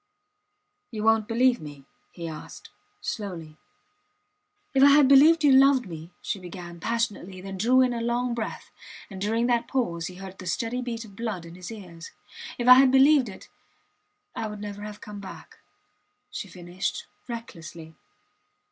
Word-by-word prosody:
You 215 -3 -5
wont 220 -1 +3
believe 245 +2 +2
me? 145 -3 -10 0.3
he 170 -2 -7
asked, 155 -1 -10 0.3
slowly. 170 -8 -6 1.2
If 270 - +3
I 280 - +9
had 280 -1 +6
believed 305 +4 +6
you 290 - +6
loved 265 -1 +5
me, 165 -2 -9
she 200 - -3
began, 175 -1 -9
passionately, 205 -3 -2
then 195 +1 -7
drew 250 +5 +4
in 250 -1 +2
a 235 - -3
long 240 +1 -1
breath; 230 -2 -5 0.4
and 190 -1 -8
during 225 +3 +1
that 240 -1 +1
pause 170 -11 -1
he 185 - -9
heard 190 0 -10
the 185 - -8
steady 230 +7 -2
beat 235 -2 -5
of 200 -2 -15
blood 215 -6 -4
in 165 - -11
his 180 0 -9
ears. 175 -6 -10 0.5
If 240 - -2
I 255 +1 +10
had 265 -1 +5
believed 270 -2 +5
it... 190 - -12 0.9
I 220 - -3
would 210 -1 -7
never 205 0 -7
have 210 0 -8
come 210 -1 -9
back, 200 - -11 0.7
she - - -6
finished, 175 0 -5 0.2
recklessly. 165 -9 -8
210 Hz, 165 wpm, -26 LUFS, 180-245 Hz, 1.2 s, I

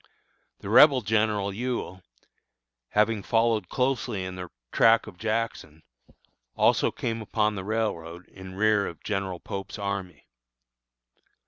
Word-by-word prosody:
The 100 - -7
Rebel 135 +2 +7
General 105 -2 0
Ewell, 115 -5 -4 0.9
having 105 0 +2
followed 115 -3 +1
closely 125 -6 -1
in 95 - -6
the 90 -1 -7 0.2
track 115 0 +4
of 90 - -12
Jackson, 110 -8 -3 0.7
also - - +3
came 115 -1 -4
upon 105 0 0
the 95 -2 -5
railroad 90 -5 -3
in 95 -1 -11
rear 105 0 +2
of 85 - -9
General 95 -3 -3
Pope's 95 +4 -6
army. 100 -3 -5
105 Hz, 120 wpm, -26 LUFS, 95-115 Hz, 0.9 s, Rebel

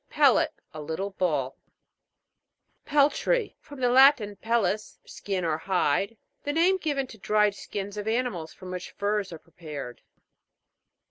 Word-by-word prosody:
PEL' - - +5
LET. - - +1 0.2
A 155 - -7
little 160 +7 -4
ball. 150 -9 -1 1.3
PEL'TRY. 300 - +2
From 285 -2 -12
the 250 - +3
Latin, 255 -5 +5
pellis, 215 -1 -1
skin 190 -3 -4
or 160 -1 0
hide. 190 +4 0 0.3
The 290 - -2
name 350 +4 +4
given 290 -5 -1
to 225 -4 -13
dried 210 +1 +2
skins 200 0 -6
of 205 +1 -4
animals 220 -9 -1
from 185 -1 -10
which 180 -1 -5
furs 205 -1 -2
are 165 - -7
prepared. 150 -7 -9
205 Hz, 140 wpm, -27 LUFS, 175-250 Hz, 1.3 s, PEL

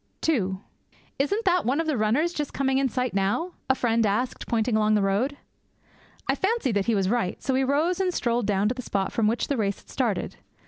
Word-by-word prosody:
II 195 -12 +1 0.6
'Isn't 405 +11 0
that 360 -2 +3
one 265 +6 +1
of 330 - 0
the 310 -2 0
runners 250 +10 +1
just 295 -3 -3
coming 265 0 +1
in 270 -1 +1
sight 250 -1 -2
now?' 200 - 0 0.2
a 265 - +4
friend 230 -2 +1
asked, 220 +5 -1
pointing 230 0 +1
along 215 0 +3
the 210 - +3
road. 220 +9 0 0.9
I - - +3
fancied 415 - 0
that 200 -2 0
he 230 - +3
was 195 -2 +1
right, 215 -4 0
so 265 - -1
we 265 +1 +2
rose 310 +7 +1
and 375 -1 +1
strolled 235 - 0
down 200 0 +2
to - - 0
the 255 - -6
spot 195 -5 -2
from 225 -2 +2
which 230 +3 0
the 280 - -1
race 200 -3 0
had - - -17
started. - - -1
245 Hz, 225 wpm, -26 LUFS, 210-285 Hz, 0.9 s, a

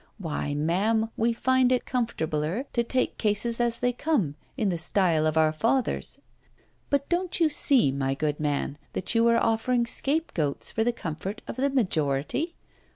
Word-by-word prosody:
Why, 155 -6 -3
ma'am, 205 +9 +1
we 230 +1 +1
find 255 +2 +2
it 250 - +1
comfortabler 185 - -2
to 235 - +2
take 255 +2 -1
cases 225 +2 0
as 235 -1 0
they 245 0 +1
come, 245 - 0 0.2
in 215 -6 +1
the 175 -2 -1
style 165 -2 +2
of 155 0 0
our 155 -1 +4
fathers. 240 +10 0 0.7
But 280 0 +1
don't 355 +1 0
you 325 -2 +4
see, 270 - +3
my 135 0 -1
good 150 0 -2
man, 145 -1 -2
that 185 - -2
you 230 0 +4
are 235 0 +4
offering 235 +2 +1
scapegoats 235 - 0
for 220 - 0
the 240 - +2
comfort 190 0 -6
of - - -5
the 275 +2 +1
majority? 185 - 0
225 Hz, 165 wpm, -26 LUFS, 155-250 Hz, 0.7 s, our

